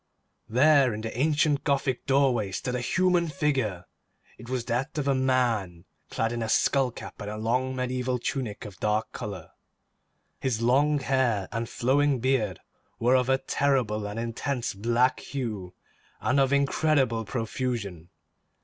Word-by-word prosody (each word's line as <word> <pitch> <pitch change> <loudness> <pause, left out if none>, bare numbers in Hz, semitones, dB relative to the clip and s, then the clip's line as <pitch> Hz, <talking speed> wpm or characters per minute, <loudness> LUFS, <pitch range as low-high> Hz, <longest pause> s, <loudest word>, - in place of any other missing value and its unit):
There 135 0 +4
in 110 - -5
the 110 0 -5
ancient 150 +2 +2
Gothic 135 -3 0
doorway 130 -7 +2
stood 125 +5 -3
a 125 - -1
human 180 +5 +2
figure. 130 - -1 0.5
It 120 +2 -11
was 130 -2 -2
that 130 +6 -2
of 145 -2 -1
a 140 - +4
man 120 -10 0 0.2
clad 115 0 -1
in 120 -1 -3
a 110 - -2
skull 135 +3 +3
cap 120 - -10
and 105 +1 -5
long 130 +3 0
mediaeval 125 0 -1
tunic 120 -4 -4
of 100 -3 -10
dark 105 +1 0
colour. 95 -5 -7 0.9
His 125 -4 -1
long 140 +6 +3
hair 125 -7 +1
and 115 +1 -3
flowing 135 +2 +2
beard 115 -8 0 0.4
were 120 +2 +2
of 130 0 +2
a 130 - +4
terrible 125 -8 0
and 105 +2 -5
intense 120 +2 -2
black 120 +5 +1
hue, 105 -10 -5 0.4
and 140 +2 +1
of 135 -1 +3
incredible 140 -4 +2
profusion. 110 -6 -4
125 Hz, 150 wpm, -27 LUFS, 110-135 Hz, 0.9 s, There